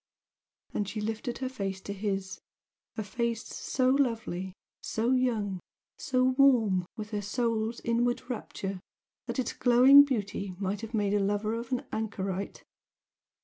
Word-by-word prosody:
And 205 -2 -1
she 215 - -4
lifted 220 +3 -3
her 260 - -2
face 195 -7 -4
to 200 - -5
his 195 -2 -3 0.6
a 220 - -1
face 235 +2 -2
so 255 -1 0
lovely, 225 -9 0 0.3
so 230 +3 0
young, 225 -7 +1 0.4
so 255 -5 +1 0.2
warm 220 -10 +4
with 210 -1 -6
her 210 -1 -1
soul's 225 +1 -1
inward 240 +1 0
rapture 195 -5 -4 0.5
that - - -3
its 255 -3 -1
glowing 255 +3 +8
beauty 205 -7 -3
might 195 +1 -2
have 225 0 -5
made 205 -2 +1
a 205 - +3
lover 205 +2 0
of 235 +1 -5
an 250 - -1
anchorite. 195 -3 -3
220 Hz, 145 wpm, -29 LUFS, 200-245 Hz, 0.6 s, glowing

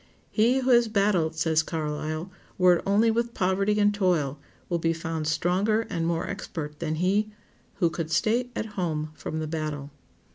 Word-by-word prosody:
"He 240 +4 +3
who 260 0 +2
has 240 -1 +5
battled," 195 -7 +1
says 160 -1 +2
Carlyle, 155 +2 -3 0.3
"were 180 -1 +5
it - - -7
only 215 +3 +4
with 235 +1 -1
poverty 195 +2 +1
and 205 0 +4
toil, 170 -9 +1 0.3
will 170 - -1
be 165 0 +1
found 160 -1 -3
stronger 190 +7 +1
and 165 -3 -1
more 170 0 -1
expert 155 -6 -6
than 160 -2 -2
he 195 +6 +1 0.5
who 175 -4 +1
could 160 -2 -4
stay 230 +9 +1
at - - -2
home 155 -5 -2
from 155 - -5
the 160 - -2
battle." 155 -2 -4
175 Hz, 175 wpm, -26 LUFS, 160-205 Hz, 0.5 s, has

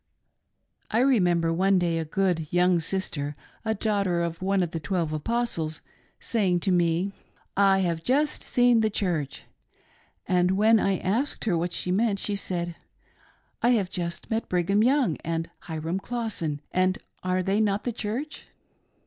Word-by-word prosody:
I 220 - 0
remember 175 -11 +3
one 190 +3 +3
day 170 -2 +1
a 160 - -2
good 165 -2 0
young 180 0 +3
sister 155 -4 -2
— - - -31
a 220 -1 0
daughter 200 -5 0
of 170 0 -4
one 195 0 +2
of 170 - -3
the 165 - -3
twelve 160 0 -1
Apostles 165 -3 -1 0.2
— - - -36
saying 190 -6 +1
to 190 - +1
me, 175 +2 +1 0.2
" - - -35
I 195 -1 +4
have 170 -3 -1
just 290 - +1
seen 245 -1 +3
the 220 -1 +2
Church," 170 -9 -2 0.8
and 180 +1 +2
when 220 +2 +5
I 195 -2 +1
asked 230 +13 -1
her 200 -6 +2
what 170 +1 -1
she 180 - -2
meant, 205 +1 +2
she 205 - -2
saidi 175 -3 -3 0.5
" - - -35
I 240 - +3
have 190 -3 -2
just 170 +2 -5
met 225 +1 -1
Brigham 185 +3 +2
Young 250 - +3
and 165 0 -3 0.2
Hyram 160 +3 -3
Clawson, 200 -11 -3
and 185 0 +2 0.2
are 185 0 0
they 195 +3 +1
not 205 -1 +1
the 245 - -2
Church 240 +8 -4
185 Hz, 170 wpm, -26 LUFS, 170-215 Hz, 0.8 s, when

